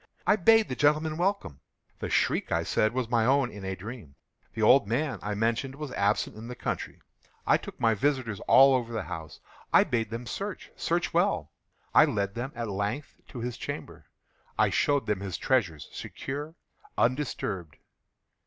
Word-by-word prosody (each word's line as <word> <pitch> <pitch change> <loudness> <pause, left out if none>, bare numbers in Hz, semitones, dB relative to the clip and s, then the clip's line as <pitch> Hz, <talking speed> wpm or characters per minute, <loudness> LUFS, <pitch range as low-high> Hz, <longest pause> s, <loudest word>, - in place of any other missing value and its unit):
I - - +5
bade 225 +3 +5
the 130 - -4
gentlemen 150 +3 +2
welcome. 180 - -1 0.4
The - - -4
shriek, - - +1
I - - +1
said, 110 - +1
was 125 -1 -2
my 115 -1 +2
own 135 +1 +3
in 105 -1 -9
a 95 0 -3
dream. 100 - -9 0.4
The 110 - -1
old 125 0 +6
man, 135 +6 -1
I 105 0 -3
mentioned, 115 +5 -1
was 150 -2 -6
absent 100 -1 0
in 110 +2 -9
the 125 - -6
country. - - -4 0.4
I - - +5
took - - -10
my 115 -1 +3
visitors 120 -2 0
all 135 0 +7
over 120 -2 0
the 110 -3 -2
house. 80 -4 -7 0.3
I - - +7
bade 115 -3 -1
them 115 +2 -5
search—search - - -3
well. - - +1 0.4
I - - +8
led 100 -1 -1
them, 120 +4 -4
at 120 -1 -3
length, 105 +8 -4
to 125 - -8
his 120 0 -4
chamber. - - -7 0.5
I - - +3
showed 145 -1 +2
them 105 -3 0
his 95 -3 -4
treasures, 90 - 0
secure, 145 +4 -6 0.4
undisturbed. 105 - -1
120 Hz, 170 wpm, -28 LUFS, 105-135 Hz, 0.5 s, I